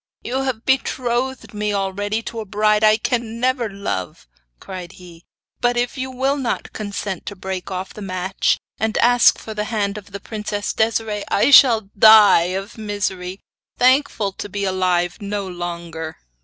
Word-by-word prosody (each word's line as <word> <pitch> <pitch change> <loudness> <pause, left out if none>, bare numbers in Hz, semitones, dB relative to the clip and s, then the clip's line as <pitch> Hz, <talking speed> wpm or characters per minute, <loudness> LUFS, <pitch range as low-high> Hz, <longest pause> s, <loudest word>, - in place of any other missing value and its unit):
'You 260 +3 -2
have 255 -4 -3
betrothed 260 -1 -1
me 210 0 -1
already 205 +3 -2
to 230 - -6
a 220 - -5
bride 210 +1 +2
I 215 0 +6
can 230 -1 -2
never 250 -2 0
love!' 195 - -5 0.3
cried 185 -1 -8
he; 175 -2 -15 0.3
'but 245 -1 +1
if 240 0 -1
you 260 -1 -4
will 265 +2 0
not 250 -4 -3
consent 200 -3 -5
to 200 - -5
break 190 -1 -5
off 185 0 -5
the 210 - -10
match, 185 0 0 0.2
and 220 0 0
ask 245 0 +5
for 220 - -8
the 210 0 -3
hand 210 -2 -2
of 205 0 -17
the 200 - -6
princess 210 0 -4
Desiree, 220 -2 0
I 240 - +3
shall 225 -7 +7
die 210 -4 +7
of 200 +4 -8
misery, 190 -3 -3 0.4
thankful 255 -5 +2
to 205 - -7
be 200 +1 -3
alive 185 0 0
no 200 -1 -3
longer. 170 -2 -6
210 Hz, 165 wpm, -20 LUFS, 190-230 Hz, 0.4 s, shall